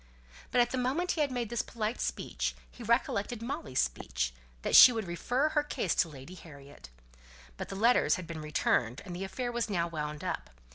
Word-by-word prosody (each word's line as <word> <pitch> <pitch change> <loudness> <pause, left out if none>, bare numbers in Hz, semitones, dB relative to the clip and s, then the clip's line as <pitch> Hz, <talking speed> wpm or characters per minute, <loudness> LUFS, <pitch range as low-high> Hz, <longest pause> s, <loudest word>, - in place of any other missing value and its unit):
But 245 -1 +3
the 260 - -1
moment 280 +9 0
after - - +1
he - - +2
had 285 -2 +1
made 240 -3 -2
this 235 - 0
polite 225 0 -3
speech, - - -2 0.2
he - - -14
recollected 230 -1 0
Molly's 230 - -4
speech - - -2 0.3
that - - +1
she 255 - +11
would 225 -3 -3
refer 245 - 0
her 305 -1 +2
case 290 - -1
to 170 - +2
Lady 140 +3 -11
Harriet. 145 - -13 0.7
But - - -6
the - - -5
letters 230 +5 +4
had 185 -4 -6
been 160 -1 -6
returned, 135 -5 0
and 180 -2 -6
the 185 - -4
affair 240 +6 -3
was 235 -1 -2
now 170 -4 0
wound 150 -2 -5
up. - - -3
200 Hz, 200 wpm, -31 LUFS, 155-245 Hz, 0.7 s, she